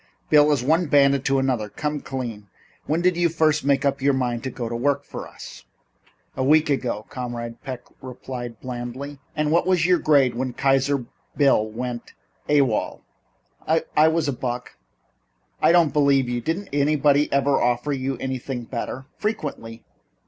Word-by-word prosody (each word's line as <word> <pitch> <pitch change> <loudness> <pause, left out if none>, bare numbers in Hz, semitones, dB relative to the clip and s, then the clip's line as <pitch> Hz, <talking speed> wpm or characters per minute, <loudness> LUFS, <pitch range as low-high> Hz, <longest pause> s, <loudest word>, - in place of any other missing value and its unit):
"Bill, 150 0 +6
as 140 -4 +1
one 160 +5 +2
bandit 140 -1 +4
to 135 0 +2
another 125 -5 0
come 150 +6 -3
clean. 115 -7 -6 0.4
When 160 +3 +1
did 180 -1 +3
you 175 -1 +3
first 155 -2 +2
make 140 0 +2
up 140 -1 0
your 140 0 +3
mind 125 -2 -1
to - - -1
go 120 -2 -5
to 115 - -4
work 140 +3 0
for - - -8
us?" - - -12 0.7
"A 130 - -1
week 150 +2 +4
ago," 120 -6 -2
Comrade 120 -2 -6
Peck 130 -3 -6 0.2
replied 125 -2 -7
blandly. 130 +3 -6 0.2
"And 150 0 0
what 170 +2 +2
was 180 -3 +3
your 180 -1 +4
grade 140 -5 +3
when 125 +1 -3
Kaiser 135 0 +1 0.3
Bill 135 -7 +4
went 120 +1 -6 0.4
A.W.O.L.?" 140 -7 +1 0.9
"I 155 +1 +6
was 160 -1 +1
a 140 - 0
buck." 125 0 -5 0.9
"I - - +5
don't 170 -4 +4
believe 140 -3 +3
you. 120 0 -2
Didn't 175 - -3
anybody 145 0 +2
ever 140 0 +2
offer 125 +4 0
you 135 -1 -2
something 130 -1 -4
better?" 125 +2 -5
"Frequently. 140 - -4
135 Hz, 165 wpm, -23 LUFS, 125-150 Hz, 0.9 s, Bill